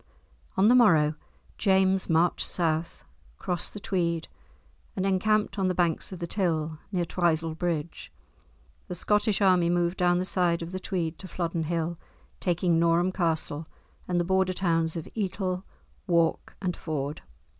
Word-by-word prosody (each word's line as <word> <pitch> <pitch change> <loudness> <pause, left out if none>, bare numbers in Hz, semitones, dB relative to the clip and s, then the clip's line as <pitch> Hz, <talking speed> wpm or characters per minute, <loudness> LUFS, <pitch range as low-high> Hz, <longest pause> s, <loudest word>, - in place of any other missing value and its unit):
On 195 +2 +5
the 240 - +6
morrow, 165 -12 +5 0.5
James 190 -1 +3
marched 165 +2 +3
south, 165 -1 -1 0.3
crossed 180 +1 -2
the - - -5
Tweed, 170 -4 -1 0.7
and 190 - -1
encamped 205 +1 +1
on 190 - +2
the 185 - 0
banks 170 0 0
of 185 - -6
the 170 - -4
Till, 160 -4 -1
near 180 -3 0
Twisel 165 -2 0
Bridge. 165 -1 -3 0.8
The 180 - -4
Scottish 210 +3 +1
army 180 -3 +4
moved 175 +1 +1
down 175 -1 +3
the 180 - -1
side 175 -3 +1
of 165 - -7
the 185 - -4
Tweed 175 -4 -3
to 190 - -8
Flodden 170 -2 -2
Hill 170 +1 -2 0.4
taking 175 -2 +1
Norham 170 +2 +3
Castle, 160 -3 -1 0.4
and 180 -1 +1
the - - +2
Border 190 0 +2
towns 165 -3 +1
of 165 - -6
Etal, 190 -3 -2 0.5
Wark, 170 -2 +1
and 180 -3 -2
Ford. 150 -2 -4
175 Hz, 155 wpm, -27 LUFS, 165-185 Hz, 0.8 s, the